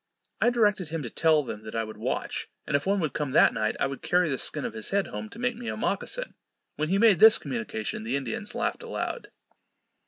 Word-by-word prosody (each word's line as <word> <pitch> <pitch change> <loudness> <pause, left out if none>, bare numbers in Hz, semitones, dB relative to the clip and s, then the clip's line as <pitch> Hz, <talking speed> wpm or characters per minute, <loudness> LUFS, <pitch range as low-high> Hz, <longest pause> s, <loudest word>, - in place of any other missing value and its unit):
I - - +5
directed 210 -7 +2
him 160 -1 -4
to 120 - -6
tell 155 -2 +3
them 105 -5 -6
that 110 +1 -8
I 115 - 0
would 110 0 -8
watch, - - -3 0.2
and - - -1
if 145 +5 0
one 200 +1 +2
would 155 -5 -1
come 145 -3 -2
that - - +6
night, 110 0 -1
I - - +2
would 135 0 -5
carry 180 -2 +2
the 135 - -1
skin 150 - -1
of - - -4
his 110 -1 -3
head 200 0 +1
home 105 +1 -6
to - - -12
make 245 0 -1
me 240 0 -6
a - - -4
mockasin. - - -2 0.4
When 155 +1 -2
he 195 - +2
made 210 -4 +5
this 220 0 +9
communication, 115 -5 -4
the 115 +4 -1
Indians 140 +9 -3
laughed - - -1
aloud. 485 - -4
155 Hz, 240 wpm, -27 LUFS, -, 0.4 s, this